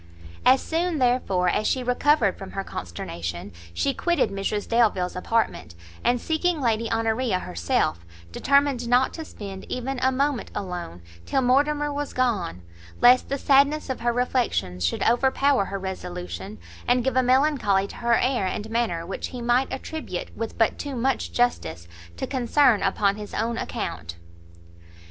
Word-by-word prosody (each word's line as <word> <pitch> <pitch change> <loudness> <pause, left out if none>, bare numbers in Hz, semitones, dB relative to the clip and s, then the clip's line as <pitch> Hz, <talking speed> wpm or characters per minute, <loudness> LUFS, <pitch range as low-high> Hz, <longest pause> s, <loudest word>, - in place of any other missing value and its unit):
As 260 +1 +6
soon, 335 0 -1
therefore, 245 -8 +1
as 210 +4 +1
she 255 - 0
recovered 250 -3 +2
from 195 - -10
her 195 - -3
consternation, 85 - -6 0.2
she 275 - 0
quitted 345 - +1
Mrs 200 +1 -2
Delvile's 215 -6 +2
apartment, 180 - -1 0.3
and 245 0 +2
seeking 320 +4 0
Lady 230 -3 0
Honoria 225 -1 +1
herself, 85 - -1 0.3
determined 280 - +2
not 250 +2 +3
to 325 - -6
spend 195 -9 -8
even 255 +1 -3
a 260 +1 +2
moment 275 -1 0
alone, 175 - -5 0.2
till 265 - +1
Mortimer 290 +3 +2
was 290 0 -4
gone; 205 - -1 0.4
lest 250 +1 +6
the 275 - -1
sadness 280 +1 +3
of 260 - -4
her 240 0 +1
reflections 240 - -1
should 85 - 0
overpower 265 0 +3
her 195 - -4
resolution, 105 - -6 0.3
and 245 0 +3
give 265 -1 0
a 260 - +5
melancholy 255 -7 +2
to - - -10
her 235 -1 +2
air 245 -5 +1
and 210 +4 -4
manner 220 -8 -1
which 190 - -4
he 250 - -8
might 240 +2 +1
attribute, 310 - -5
with 225 0 -5
but 225 - +2
too 285 -2 -4
much 255 +2 -1
justice, 85 - -1 0.3
to - - -2
concern 255 -2 +3
upon 200 +1 +1
his 210 -1 -7
own 230 +2 -1
account. 85 - -4
235 Hz, 155 wpm, -25 LUFS, 190-265 Hz, 0.4 s, As